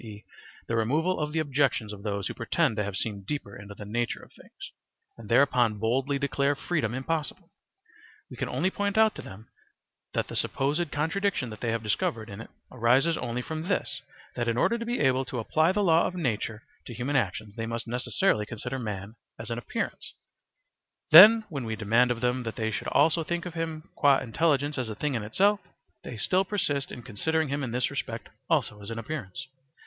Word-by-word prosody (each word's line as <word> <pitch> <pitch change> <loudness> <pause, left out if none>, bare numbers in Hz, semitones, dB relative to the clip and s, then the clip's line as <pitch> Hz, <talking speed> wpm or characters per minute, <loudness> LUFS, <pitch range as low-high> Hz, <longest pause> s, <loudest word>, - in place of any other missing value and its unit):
e., 105 -2 -10 0.4
the 115 - -1
removal 155 +11 +1
of 150 -1 -2
the 160 - -3
objections 135 -7 +1
of 100 - -10
those 100 -2 -2
who - - -4
pretend 125 +2 0
to 105 - 0
have 100 -1 -4
seen 100 -1 -2
deeper 100 -2 -5
into 100 0 -10
the 105 - -9
nature 120 +3 -2
of - - -17
things, - - -12 0.4
and 115 -3 -12
thereupon 120 -3 +4
boldly 130 +6 0
declare 140 0 +1
freedom 140 -7 -1
impossible. 160 +5 -3 0.8
We - - -10
can - - -3
only 190 - 0
point 205 +1 -1
out 220 -1 +5
to - - -8
them 105 +4 -12 0.7
that - - 0
the - - -7
supposed 145 +3 0
contradiction 160 - -1
that 105 - -10
they 120 - -1
have 115 0 -1
discovered 110 +1 -1
in 100 +3 -7
it - - -11 0.2
arises 130 +7 +3
only 125 -1 -3
from 160 +4 -5
this, 200 - -1 0.3
that 120 -1 -1
in 115 0 0
order 235 - +2
to 230 - -4
be 240 - -1
able 130 -1 +3
to 125 - -5
apply 155 +9 +2
the 205 +2 +1
law 165 -3 +4
of 185 - -6
nature 115 - -2 0.2
to 120 - -7
human 125 +5 -2
actions, 105 -3 -1
they 115 -1 -3
must 115 +1 -3
necessarily 125 - 0
consider 125 +3 -5
man 105 -3 -5 0.2
as 115 +1 -6
an 115 - -2
appearance: - - -4 1.0
then 215 +7 +11
when 145 -9 -5
we 110 -1 -3
demand 115 +4 +3
of 120 -1 -1
them 125 +1 +1
that 115 -2 -5
they 110 -2 -1
should - - -4
also 160 +3 +3
think 170 +2 -3
of 180 - -6
him 160 -2 -4
qua 140 -2 +5
intelligence 145 +2 0
as 125 -3 -2
a 110 - -5
thing 145 +5 -2
in 115 - -1
itself, 200 - +2 0.4
they 115 - -7
still 185 - +2
persist 155 -9 -1
in 120 - -8
considering 155 +7 -1
him 140 +1 -1
in 125 - -2
this 125 +1 0
respect - - -5 0.2
also 105 -1 +1
as 100 - -7
an 115 - -5
appearance. 125 -2 -5
125 Hz, 205 wpm, -28 LUFS, 110-155 Hz, 1.0 s, then